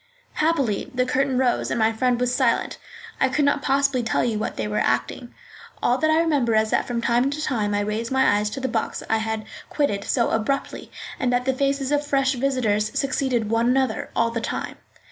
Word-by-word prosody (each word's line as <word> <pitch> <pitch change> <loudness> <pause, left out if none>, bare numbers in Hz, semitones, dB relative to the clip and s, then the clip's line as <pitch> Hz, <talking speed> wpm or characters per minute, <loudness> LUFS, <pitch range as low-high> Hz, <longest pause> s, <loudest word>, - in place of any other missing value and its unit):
Happily, 280 -11 0
the 250 0 +2
curtain 265 0 0
rose 255 -2 +1
and - - -1
my 225 0 +2
friend 245 +1 +1
was 250 0 0
silent. - - 0 0.4
I 265 - +3
could 290 +2 +1
not 285 0 +2
possibly 275 -2 +1
tell 230 - 0
you 225 -3 -1
what - - -4
they 110 - -2
were 105 0 -1
acting. 180 - -1 0.5
All 245 +2 +2
that 315 - +2
I 315 +1 +4
remember 280 -9 +1
is 220 0 +2
that - - +1
from 240 -2 -2
time 240 +3 +2
to 285 +2 -4
time 215 -9 -1
I 205 - +1
raised 215 +3 -3
my 265 -6 +3
eyes 210 0 -1
to 270 - -6
the 260 - -2
box 230 -2 -2
I 225 - +3
had 220 0 -3 0.2
quitted 205 -10 0
so 235 -3 +1
abruptly, 225 +5 -2 0.3
and 250 - +1
that 245 0 0
the 265 - +2
faces 275 +1 -1
of 290 0 +2
fresh 275 -2 +1
visitors 240 -5 0
succeeded 260 -5 0
one 230 +1 +2
another 260 -3 0
all 230 0 +2
the 230 0 -3
time. - - -4
250 Hz, 215 wpm, -23 LUFS, 220-275 Hz, 0.5 s, I